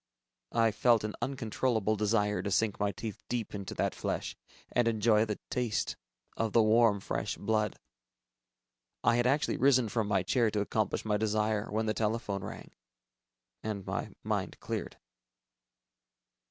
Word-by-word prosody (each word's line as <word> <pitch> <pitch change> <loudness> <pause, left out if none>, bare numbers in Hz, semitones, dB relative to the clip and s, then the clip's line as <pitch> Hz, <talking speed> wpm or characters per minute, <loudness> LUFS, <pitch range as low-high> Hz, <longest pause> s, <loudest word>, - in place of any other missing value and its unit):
I 115 -1 +4
felt 115 +1 +3
an 105 0 -3
uncontrollable 115 -4 0
desire 105 0 +1
to 100 - -3
sink 105 +2 +1
my 100 0 +1
teeth 110 +1 -6
deep 120 -3 -2
into 100 -2 -5
that - - 0
flesh, - - -3 0.4
and 120 -1 +2
enjoy 110 -1 +3
the 105 -2 -3
taste 120 -4 -1 0.4
of 115 -2 -1
the 115 - +6
warm 110 -1 +4
fresh - - -3
blood. 105 -1 0 1.3
I 115 - +4
had 120 0 +3
actually 145 +3 +1
risen 130 -4 +4
from 110 -1 0
my 100 -3 +2
chair 115 +5 +2
to 105 - -1
accomplish 105 0 -1
my 105 -1 +2
desire, 110 0 0
when 110 +2 0
the 110 - +1
telephone 105 -3 -1
rang... - - -8 0.9
and 105 -3 -4
my - - -3
mind - - -2
cleared. - - -4
110 Hz, 150 wpm, -31 LUFS, 105-115 Hz, 1.3 s, the